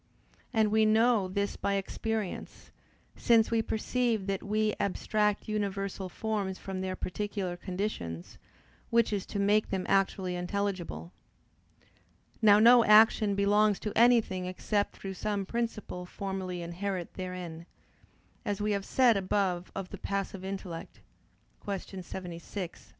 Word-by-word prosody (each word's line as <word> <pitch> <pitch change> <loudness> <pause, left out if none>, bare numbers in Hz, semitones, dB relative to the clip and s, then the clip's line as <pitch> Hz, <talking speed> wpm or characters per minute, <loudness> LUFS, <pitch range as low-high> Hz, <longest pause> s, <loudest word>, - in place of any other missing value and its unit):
And 220 -3 +2
we 220 0 +4
know 220 -1 +4
this 200 +2 -2
by 200 - -1
experience, 210 +1 -4 0.4
since 230 -2 +4
we 230 -1 +3
perceive 225 -1 0
that 195 -1 -2
we 215 +1 0
abstract 210 +1 0
universal 195 -2 -2
forms 205 -2 -2
from 190 -1 -5
their 185 0 -2
particular 195 -1 -3
conditions, 175 - -5 0.5
which 230 -2 +3
is 200 -2 -2
to - - -5
make 205 +2 +3
them 190 -2 -2
actually 190 -2 +1
intelligible. 185 -1 -3 1.3
Now 205 -2 +7
no 235 +2 +8
action 215 -1 +6
belongs 205 +1 +3
to 210 - -4
anything 225 -6 +4
except 205 +3 -1
through 195 -1 -6
some 200 +1 -2
principle 215 -5 -4
formally 185 -2 -4
inherent 180 +1 -4
therein; 180 -3 -6 0.8
as 205 -3 -2
we 210 0 0
have 200 -1 -1
said 245 -5 +4
above 185 -2 0
of 190 -2 -4
the - - -8
passive 195 -1 -3
intellect 190 -3 -6 0.6
(Q. 195 -1 -5
76, 180 0 -7
A. - - -24
200 Hz, 130 wpm, -30 LUFS, 185-215 Hz, 1.3 s, no